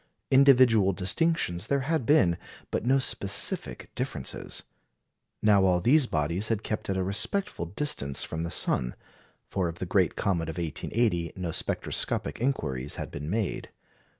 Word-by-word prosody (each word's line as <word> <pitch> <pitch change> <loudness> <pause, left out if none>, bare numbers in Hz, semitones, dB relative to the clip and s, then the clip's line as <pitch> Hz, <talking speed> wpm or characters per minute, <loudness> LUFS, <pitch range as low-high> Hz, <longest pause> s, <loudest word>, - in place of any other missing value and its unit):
Individual 125 -7 +5
distinctions 95 - 0
there 140 -1 +1
had 150 -2 -1
been, 145 - +4 0.4
but - - -1
no 130 +3 +3
specific 100 -6 +1
differences. - - -5 0.8
Now 105 -2 +5
all 90 -2 +3
these 130 - +4
bodies 85 +6 -1
had 110 -2 -1
kept 110 - -4
at 95 - 0
a 95 - 0
respectful 100 - 0
distance 100 - -1
from 80 - -5
the 85 - -3
sun; - - 0 0.6
for 95 -3 0
of 85 0 -6
the 90 - -4
great 90 0 +1
comet 85 -4 -1
of 80 - -6
1880 85 - -1
no 90 -3 -4
spectroscopic - - -1
inquiries 70 - -2
had - - -6
been 75 +2 -6
made. 105 0 -2
95 Hz, 150 wpm, -27 LUFS, 85-130 Hz, 0.8 s, Individual